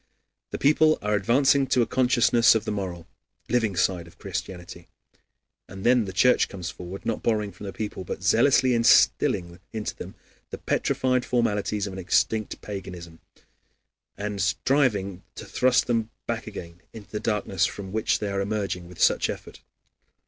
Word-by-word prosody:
The - - -4
people 155 +2 +4
are 105 0 0
advancing 135 +7 +3
to 125 -1 +3
a - - -1
consciousness 125 -1 +4
of 110 - -1
the - - -2
moral, 90 -5 -4 0.4
living 110 -5 +1
side 90 -1 0
of 85 - -18
Christianity. 90 -2 -7 0.8
And 95 +1 -10
then 120 -2 +4
the 95 - -5
Church 125 +7 +3
comes 90 -4 -6
forward, 90 +2 -9
not 115 - -2
borrowing 105 -3 0
from 100 +3 -10
the - - -4
people, 100 0 -5
but 90 - -6
zealously 125 +4 +4
instilling 90 -6 +3
into 110 -1 -4
them - - -9 0.3
the - - -6
petrified 130 -1 0
formalities 105 -4 0
of 100 - -6
an 95 - -6
extinct 105 +4 0
paganism, 90 -5 -8 1.0
and 105 -1 -3
striving 100 -3 +1
to - - -8
thrust 125 0 +2
them 115 -2 0 0.2
back 115 -1 -4
again 85 -4 -9
into 110 -3 -12
the 105 - -3
darkness 105 -5 0
from 95 -2 -8
which 110 +1 +1
they 105 - -3
are 100 0 -1
emerging 100 -3 -3
with 90 -1 -14
such - - +3
effort. - - -8
105 Hz, 165 wpm, -25 LUFS, 95-120 Hz, 1.0 s, people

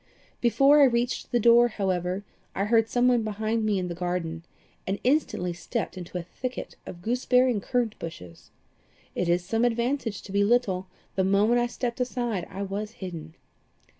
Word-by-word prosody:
"Before 275 +5 +5
I - - +9
reached 240 -1 0
the 240 - +3
door, 235 +1 +6
however, 190 -3 -2 0.3
I 195 - 0
heard 225 +1 +3
some 245 0 +2
one 245 -2 +4
behind 220 +1 -1
me 210 -2 +1
in 180 -1 -2
the 175 - -4
garden, 175 -2 -3 0.5
and 195 +1 0
instantly 250 - +1
stepped 205 +7 -4
into 180 0 -6
a 175 - -4
thicket 250 +8 -6
of 175 0 -9
gooseberry 250 +2 +3
and 210 -4 -1
currant 235 -1 -1
bushes. 90 - -9 0.6
It 180 - -1
is 175 +1 +2
sometimes 225 +5 +1
an - - +2
advantage 235 -3 -2
to - - -10
be 200 +1 +3
little 200 -5 +1 0.3
the 190 - +1
moment 205 +5 +3
I 240 - +1
stepped 240 0 -4
aside 240 -7 -2
I 195 +2 -5
was 205 +2 -4
hidden. 165 -6 -8
215 Hz, 180 wpm, -26 LUFS, 180-240 Hz, 0.6 s, I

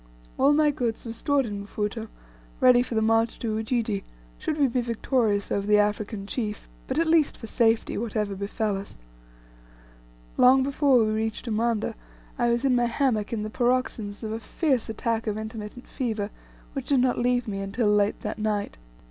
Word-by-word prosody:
All 275 +2 +5
my 300 0 +4
goods 240 -5 -3
were 230 - -4
stored 280 +3 +1
in 205 -2 -5
Mfuto, 210 +2 -4 0.5
ready 250 -1 +6
for 245 -2 -4
the 220 - +2
march 225 +1 +2
to 220 -2 -2
Ujiji, 220 -2 -1 0.4
should 305 - -2
we 285 -2 +4
be 250 0 0
victorious 230 -3 0
over 200 0 -1
the 210 0 +5
African 210 0 0
chief, 210 -1 -4 0.2
but 260 - -2
at 330 - +3
least 320 -2 +3
for - - -8
safety, 225 -1 +1
whatever 215 -2 -2
befel 200 +1 -2
us. 195 - -9 1.4
Long 260 +1 +6
before 275 -1 +3
we 215 - 0
reached 220 +1 -2
Umanda, 225 0 0 0.5
I 240 - +3
was 235 +3 +1
in 260 -2 +4
my 240 0 +3
hammock 235 -3 0
in 220 -2 -2
the 215 - -5
paroxysms 240 -4 -1
of 215 - -3
a 220 - -3
fierce 265 0 -1
attack 225 0 -2
of 210 0 -1
intermittent 220 +2 -7
fever, 220 -5 -3 0.4
which 275 -3 -5
did 275 -2 +3
not 250 0 +2
leave 245 0 +1
me 195 -2 -3
until 200 +4 -1
late 205 0 +1
that - - -4
night. 210 - -2
225 Hz, 180 wpm, -26 LUFS, 210-250 Hz, 1.4 s, ready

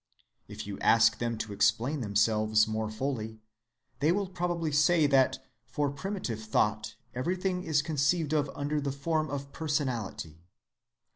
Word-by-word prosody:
If - - -7
you - - -6
ask - - +4
them 115 -1 -2
to 110 -1 -5
explain 115 +8 +1
themselves 110 0 +2
more 110 0 -2
fully, 110 -1 -4 0.6
they 150 +3 +3
will 200 +2 +1
probably 175 -3 -2
say 155 +2 +4
that 135 -2 +3 0.3
for 145 -1 -1
primitive 140 - -4
thought 110 0 0 0.2
everything 180 +7 -1
is 150 -2 +1
conceived 155 +1 +1
of 145 -2 +1
under 145 +1 -1
the 140 -1 -2
form 155 +3 -1
of 140 0 -5
personality. 125 - -3
140 Hz, 140 wpm, -29 LUFS, 110-155 Hz, 0.6 s, ask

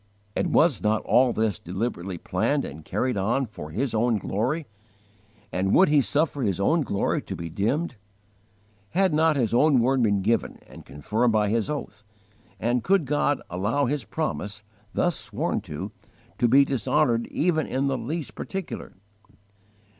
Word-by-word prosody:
And - - 0
was 145 - +3
not 110 +2 +1
all 125 0 +4
this 110 -6 0
deliberately 95 -1 -4
planned - - 0
and 75 +3 -8
carried 125 +5 -1
on 115 +8 +1
for 90 -9 -9
His 120 - -2
own 115 0 +2
glory? 125 - -1 0.9
And 95 +1 +1
would 190 - +6
He 150 -1 +5
suffer 145 +2 0
His 100 -6 0
own 160 +12 +3
glory 100 -8 0
to - - -6
be 85 -1 -6
dimmed? 125 - -1 1.0
Had 190 -4 +3
not 160 0 +3
His 120 -6 0
own 140 +2 +5
word 130 +2 +2
been 100 -4 +2
given 115 +3 0
and - - -14
confirmed 110 - 0
by 105 -1 +2
His 115 +4 0
oath, 120 -8 -5 0.6
and 120 +1 0
could 195 -4 +3
God 145 0 +1
allow 105 +11 0
His 140 +1 -1
promise, 105 -8 -4 0.3
thus 175 -3 +1
sworn - - -2
to, - - -5 0.5
to 120 - +4
be 135 +4 +6
dishonoured 125 -1 +1
even 160 -2 0
in 135 +2 -1
the 135 -1 +1
least 150 +5 -4
particular? 190 -3 -6
120 Hz, 160 wpm, -25 LUFS, 105-145 Hz, 1.0 s, would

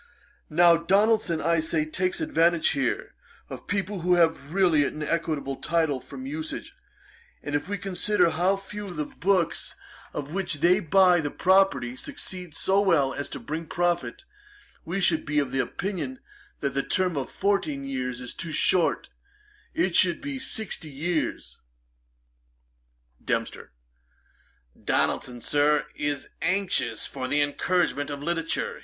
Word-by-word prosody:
Now 170 +1 +6
Donaldson, 195 0 +2
I 170 +2 +2
say, 160 -1 0
takes 185 - -1
advantage 170 - +3
here, 135 -4 -1 0.4
of - - -8
people 200 0 -2
who 180 +1 +3
have 160 -4 +2
really 175 -5 +4
an 155 +2 -3
equitable 150 -4 -2
title 160 -4 0
from 260 - -9
usage; 315 +6 -5 0.7
and 145 - -5
if 145 +4 -1
we 205 - -1
consider 195 -1 +1
how 180 +5 +2
few 205 +1 -8
of 180 - -7
the 150 -1 -2
books, 180 0 0 0.4
of 145 +2 -5
which 185 -3 -1
they 175 +6 +4
buy 180 0 +5
the 145 -2 -2
property, 185 -9 +2
succeed 180 - -6
so 195 +1 +2
well 155 -9 +3
as 145 - -4
to - - -6
bring 160 +2 -5
profit, 175 - -1 0.6
we 175 +4 -2
should 165 -3 +3
be 150 0 -2
of 140 -3 +1
opinion 140 0 -3 0.4
that 140 - -1
the 140 - +1
term 180 +3 0
of 135 -2 -3
fourteen 190 -8 0
years 125 -2 -3
is 125 - -6
too 165 - -5
short; 175 +3 +2 0.6
it 170 +1 +1
should 175 -2 +5
be 280 -2 -5
sixty 215 -10 -3
years.' 155 +4 -3 1.6
DEMPSTER. - - -3 1.1
'Donaldson, 120 -1 0
Sir, 150 +2 +2
is 145 -1 -2
anxious 180 - 0
for 130 -2 -5
the 145 +3 +1
encouragement 145 -1 0
of 145 0 -5
literature. 165 0 -2
170 Hz, 140 wpm, -26 LUFS, 145-190 Hz, 1.6 s, Now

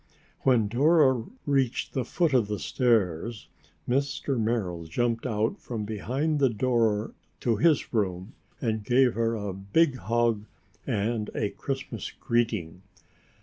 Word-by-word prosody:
When 120 -5 +3
Dora 130 0 +4 0.2
reached 135 -4 0
the 130 - 0
foot 160 +5 0
of 120 -5 +3
the 105 0 -2
stairs, 110 -3 0 0.4
Mr. 135 0 0
Merrill 105 -7 -1
jumped 115 +8 -1
out 110 -1 -1
from 110 -4 -4
behind 130 - -1
the 135 -2 +4
door 115 -2 +1 0.3
to 115 -3 +1
his 155 +4 +2
room 95 -2 -1 0.3
and 110 -3 -1
gave 125 +2 +4
her 115 0 0
a 100 -3 -4
big 130 - +1
hug 115 -3 0 0.4
and 110 -2 -1
a 105 - -1
Christmas 135 -5 -5
greeting. 110 -8 -1
115 Hz, 130 wpm, -27 LUFS, 105-130 Hz, 0.4 s, Dora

